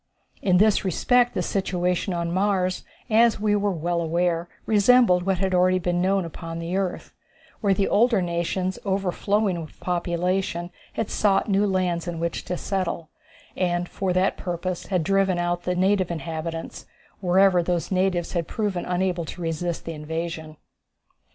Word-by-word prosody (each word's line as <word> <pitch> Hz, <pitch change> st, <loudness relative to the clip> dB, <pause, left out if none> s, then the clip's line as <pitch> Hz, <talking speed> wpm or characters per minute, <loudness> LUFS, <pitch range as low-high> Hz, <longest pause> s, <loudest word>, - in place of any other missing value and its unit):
In 185 Hz, -2 st, +3 dB
this 215 Hz, +2 st, +4 dB
respect 245 Hz, +6 st, +2 dB
the -, -, 0 dB
situation 180 Hz, -1 st, -1 dB
on 170 Hz, -1 st, -2 dB
Mars, 185 Hz, -1 st, 0 dB, 0.2 s
as 230 Hz, -1 st, +4 dB
we 210 Hz, 0 st, +2 dB
were 205 Hz, 0 st, +1 dB
well 170 Hz, 0 st, -1 dB
aware, 170 Hz, +1 st, 0 dB, 0.2 s
resembled 210 Hz, -4 st, +4 dB
what 190 Hz, -1 st, +2 dB
had 190 Hz, +1 st, 0 dB
already 185 Hz, 0 st, +4 dB
been 175 Hz, 0 st, 0 dB
known 190 Hz, 0 st, +2 dB
upon 165 Hz, 0 st, -7 dB
the 170 Hz, +2 st, -3 dB
earth, 190 Hz, -2 st, -3 dB, 0.5 s
where 200 Hz, -3 st, +2 dB
the 195 Hz, -, +1 dB
older 230 Hz, 0 st, +3 dB
nations 175 Hz, +1 st, -1 dB
overflowing 195 Hz, -1 st, 0 dB
with 155 Hz, -, -11 dB
population 175 Hz, 0 st, -1 dB, 0.2 s
had 225 Hz, -, -3 dB
sought 200 Hz, -2 st, +2 dB
new 200 Hz, +1 st, +3 dB
lands 180 Hz, -3 st, 0 dB
in 170 Hz, -1 st, -4 dB
which 170 Hz, 0 st, -2 dB
to 180 Hz, -, -3 dB
settle, 185 Hz, -5 st, -3 dB, 0.5 s
and 175 Hz, -1 st, 0 dB
for 190 Hz, 0 st, -2 dB
that 185 Hz, +2 st, +1 dB
purpose 175 Hz, 0 st, -4 dB
had 180 Hz, -4 st, 0 dB
driven 195 Hz, 0 st, +2 dB
out 175 Hz, 0 st, -1 dB
the 180 Hz, -, 0 dB
native 190 Hz, 0 st, +2 dB
inhabitants, 165 Hz, 0 st, -5 dB, 0.3 s
whenever 185 Hz, 0 st, +4 dB
those 175 Hz, +1 st, -2 dB
natives 185 Hz, -2 st, +1 dB
had 170 Hz, -3 st, -1 dB
proven 205 Hz, -5 st, -2 dB
unable 180 Hz, -1 st, 0 dB
to 170 Hz, -, -8 dB
resist 165 Hz, +1 st, -3 dB
the 165 Hz, -, -4 dB
invasion. 160 Hz, 0 st, -5 dB
180 Hz, 155 wpm, -24 LUFS, 170-195 Hz, 0.5 s, this